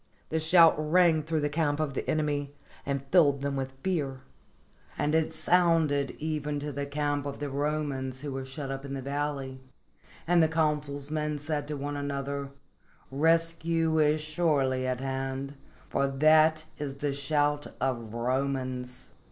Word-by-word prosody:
The 160 - 0
shout 165 +1 +6
rang 160 +1 +4
through 160 0 -1
the 145 - +1
camp 150 -1 0
of 155 -3 -1
the - - -4
enemy 145 -2 -1 0.3
and 140 -1 -2
filled 145 -6 +4
them 140 -1 -1
with 135 -1 -3
fear; 145 -8 -1 0.8
and 150 +1 0
it 160 0 +2
sounded 160 -4 +2
even 150 -1 -2
to 145 +1 -4
the 140 +1 -4
camp 145 0 -1
of 140 - -5
the 145 -1 -4
Romans 140 -2 -2
who 145 -1 -4
were 135 0 -4
shut 135 +1 -6
up 135 0 -5
in 140 -1 -5
the 135 - -5
valley, 140 -1 -3 0.6
and 175 0 +4
the 160 - +5
consul's 150 -3 -1
men 150 -1 -1
said 145 0 -3
to 150 -1 -3
one 145 +1 -4
another, 140 0 -3 0.6
"Rescue 165 +2 +2
is 150 0 +3
surely 145 -5 +1
at 130 0 -2
hand, 135 +1 -3 0.3
for 140 - +1
that 155 +3 +4
is 140 -2 -4
the 140 0 -2
shout 145 +1 0
of 115 -4 -2
Romans." 130 0 -2
145 Hz, 160 wpm, -29 LUFS, 135-155 Hz, 0.8 s, shout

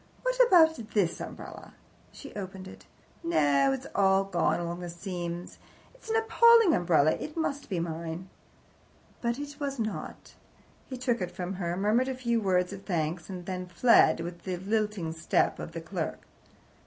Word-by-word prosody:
What - - -1
about 320 -5 +6 0.2
this 185 -5 +1
umbrella?" - - -9 0.4
She 280 - -11
opened 190 -1 -7
it. - - -13 0.4
"No, 145 - +3
it's 135 - -3
all 195 -1 +4
gone 185 -3 0
along 170 0 -4
the 175 -1 -6
seams. 175 -1 -6 0.3
It's - - -15
an 445 - +1
appalling 450 -3 +6
umbrella. 160 -4 +3
It 305 - -5
must 290 -3 -2
be 185 -4 -1
mine." 165 +2 -4 0.9
But 235 0 -1
it 290 +1 -7
was 280 -2 -3
not. 220 -2 -5 0.5
He 260 - -6
took 245 -3 -1
it 180 - -2
from 180 +1 -5
her, 170 0 -2
murmured 215 +6 +2
a 265 - -2
few 235 -2 0
words 180 -1 +1
of 195 - -8
thanks, 170 -2 -2
and 180 -2 -7
then 185 -1 -4
fled, 175 -3 +4
with 170 +1 -6
the 185 -2 -3
lilting 205 -3 -1
step 160 - +1
of - - -7
the - - -5
clerk. - - -4
190 Hz, 165 wpm, -28 LUFS, 175-255 Hz, 0.9 s, about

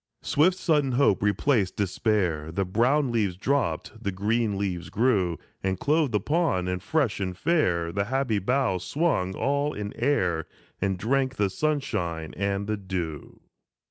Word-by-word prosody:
Swift 180 +5 +3
sudden 150 -7 +1
hope 125 -6 +3
replaced 105 0 +1
despair; 95 -6 0
The 95 +3 -1
brown 125 +8 +2
leaves 105 -6 0
dropped, 110 - -1
the 100 - -1
green 105 +2 0
leaves 90 -3 -3
grew, 100 -8 +1 0.2
And 95 -1 -1
clothed 150 -5 +1
upon, 125 - +1
and 90 0 -2
fresh 135 -1 0
and 90 -2 -3
fair, 90 - +1
The 100 +2 -1
happy 130 -3 0
boughs 100 -4 0
swung 140 - 0
all 145 +2 0
in 105 0 -5
air, 95 - 0 0.3
And 95 -1 0
drank 130 +6 0
the 100 -2 +1
sunshine 95 - -2
and 100 +1 -1
the 110 +1 -1
dew. 90 -6 -5
105 Hz, 145 wpm, -26 LUFS, 95-135 Hz, 0.3 s, Swift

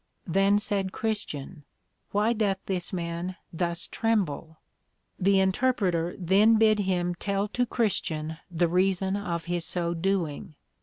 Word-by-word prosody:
Then 195 +3 +3
said 200 -2 -1
Christian, 185 -9 -4 0.5
Why 210 +3 +2
doth 210 -4 +1
this 180 -3 -2
man 175 +1 -3 0.2
thus 170 0 -1
tremble? 170 -8 -1 0.6
The 195 +1 +4
Interpreter 190 -4 +1
then 195 +5 +4
bid 215 -1 +4
him 180 -3 0
tell 200 +3 -1
to 245 +3 0
Christian 160 -10 -1
the 175 0 +1
reason 190 +2 +1
of 170 -5 -3
his 175 -1 -1
so 170 0 0
doing. 170 -4 -2
185 Hz, 130 wpm, -27 LUFS, 170-205 Hz, 0.6 s, The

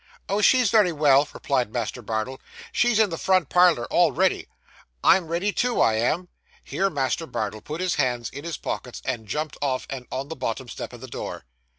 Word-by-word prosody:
'Oh, 200 +2 0
she's 250 -1 +5
very 210 -6 +5
well,' 145 -2 +4
replied 125 -6 -1
Master 120 +1 -3
Bardell. 115 +4 -3 0.3
'She's 240 -3 +2
in 215 -4 +3
the 165 - -4
front 185 -6 +2
parlour, 175 -9 +4
all - - +5
ready. - - +1 0.6
I'm 185 -3 +5
ready 175 +5 0
too, 245 -1 0
I 110 - +4
am.' 140 +11 0 0.4
Here 195 +1 0
Master 145 +1 -1
Bardell 110 -4 -4
put 155 +8 -6
his 185 -1 +1
hands 120 -2 -1
in 140 - -8
his 170 -3 -4
pockets, - - -5
and 110 -2 -3
jumped 150 +7 -3
off 135 -3 -1
and 130 -2 -6
on 135 +2 -4
the 160 - -5
bottom 130 -1 -3
step - - -6
of 120 -1 -11
the 130 - -8
door. - - -6
145 Hz, 200 wpm, -24 LUFS, 125-180 Hz, 0.6 s, she's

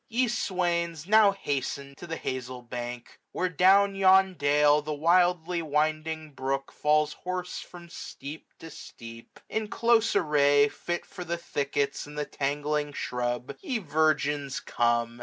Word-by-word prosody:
Te 245 +2 +1
swains 175 -7 -1
now 210 +1 +6
hasten 140 -6 -4
to 175 - -11
the 165 - -4
hazeUbank; 125 -1 -5 0.3
Where, 185 - 0
down 195 +4 +4
yon 190 0 +5
dale, 145 -1 +3
the 150 0 -4
wildly 175 +2 +2
winding 155 +1 -1
brook 135 0 -3
Falls 150 0 +1
hoarse 180 0 -4
from 175 -1 -11
steep 150 -2 -9
to 165 - -11
steep. 115 -3 -12
In 220 -1 -2
close 230 +1 +2
array, 145 -1 +4
611 175 +3 -3
Fit - - -17
for 180 - -8
the 170 0 -3
thickets 140 -3 -2
and 150 0 -10
the 150 - -1
tangling 145 +1 -2
shrub. 125 -1 -3
Ye 285 -11 -2
virgins 150 -6 0
come. 120 0 0
150 Hz, 140 wpm, -27 LUFS, 140-180 Hz, 0.3 s, now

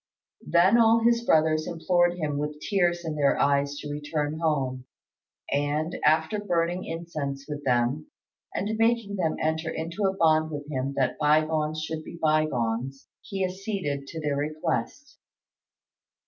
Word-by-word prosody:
Then 185 +7 +5
all 225 0 +5
his 235 0 +3
brothers 155 -5 +3
implored 175 +1 +2
him 150 -4 -2
with 150 0 -4
tears 175 -2 0
in 160 -1 -3
their 145 -2 +2
eyes 140 0 +2
to 150 - -6
return 150 +1 -3
home, 135 -6 -1 0.7
and, 145 +4 0
after 160 +7 +3
burning 175 -2 -1
incense 155 -5 -5
with 145 -1 -5
them, 125 +4 +1 0.4
and 210 +3 -2
making 225 -3 +1
them 165 -4 0
enter 160 +1 -1
into 170 +6 -3
a 190 0 -2
bond 155 -2 +3
with 145 -2 -6
him 135 0 -2
that 130 -2 0
by 155 +1 +4
gones 155 0 -1
should 160 -1 -4
be 170 - -9
by 155 -1 +3
gones, 125 +1 -3
he 195 -1 -2
acceded 185 -7 -3
to 160 - -6
their 150 -2 -1
request. 155 - -3
155 Hz, 150 wpm, -26 LUFS, 145-175 Hz, 0.7 s, Then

